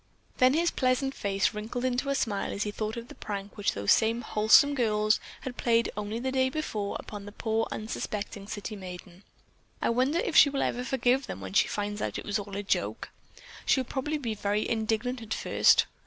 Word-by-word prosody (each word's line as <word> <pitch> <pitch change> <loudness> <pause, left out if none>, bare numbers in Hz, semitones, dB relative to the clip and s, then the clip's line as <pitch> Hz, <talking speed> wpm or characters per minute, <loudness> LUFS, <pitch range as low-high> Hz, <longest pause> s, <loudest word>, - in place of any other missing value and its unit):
Then 255 +2 +5
his 335 +1 +2
pleasant 260 +1 +1
face 195 -4 0
wrinkled 225 +4 -4
into 255 +2 0
a 275 - +1
smile 210 -6 -1
as 200 - -2
he 210 - -3
thought 215 +2 -3
of 235 0 -6
the - - -11
prank 200 -1 -6
which 205 - 0
those 100 0 +1
same 225 +2 +3
wholesome 220 +7 +5
girls 215 -4 +2 0.2
had 250 -2 -6
played 230 -1 +2
only 210 +1 -3
the 260 +2 -2
day 260 0 +2
before 220 -9 -3
upon 205 -1 -8
the 205 - -8
poor, 220 +1 -1
unsuspecting 210 -1 -4
city 210 +1 -5
maiden. 180 -1 -9 0.6
"I - - +1
wonder 260 +7 +2
if 445 - -1
she 285 - +8
will 275 -1 -1
ever 245 - -1
forgive 255 0 +1
them 195 - -6
when 95 -1 -7
she - - +4
finds 205 0 -3
out - - -2
that - - -3
it - - -13
was 205 +1 0
all 200 -1 -6
a 205 - -3
joke. 200 - -1 0.5
She'll 260 - +3
probably 280 +4 -2
be 235 -6 -3
very 205 0 -1
indignant 225 +2 -1
at 220 -1 -3
first. - - +4
220 Hz, 210 wpm, -28 LUFS, 205-255 Hz, 0.6 s, she